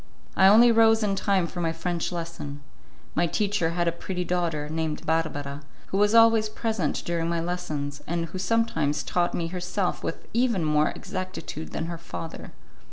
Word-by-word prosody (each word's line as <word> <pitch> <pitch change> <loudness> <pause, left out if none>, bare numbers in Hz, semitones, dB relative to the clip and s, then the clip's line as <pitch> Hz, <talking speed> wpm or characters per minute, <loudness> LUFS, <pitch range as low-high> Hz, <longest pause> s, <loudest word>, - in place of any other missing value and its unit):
I 190 - +6
only 230 +4 +8
rose 225 -1 +5
in 200 -2 +1
time 195 -2 +1
for 175 +1 -5
my 165 -1 +1
French 170 +1 -2
lesson. 165 -4 -6 0.5
My 175 +1 +2
teacher 205 -2 0
had 175 0 +1
a - - +3
pretty 180 +1 -4
daughter, 165 -4 -1
named 155 0 -3
Barbara, 145 -3 -1 0.3
who 195 - 0
was 210 +2 +4
always 225 -1 +6
present 215 -8 -2
during 170 -1 -1
my 170 0 0
lessons, 155 -5 -3
and 170 0 -1
who 185 +3 -7
sometimes 185 -9 +1
taught 175 -1 0
me 165 -1 -2
herself 180 +1 -2
with - - -4
even 230 -7 +2
more 150 0 +3
exactitude 185 -4 -6
than 160 - -3
her 170 0 -5
father. 165 -1 -7
175 Hz, 170 wpm, -26 LUFS, 160-195 Hz, 0.5 s, only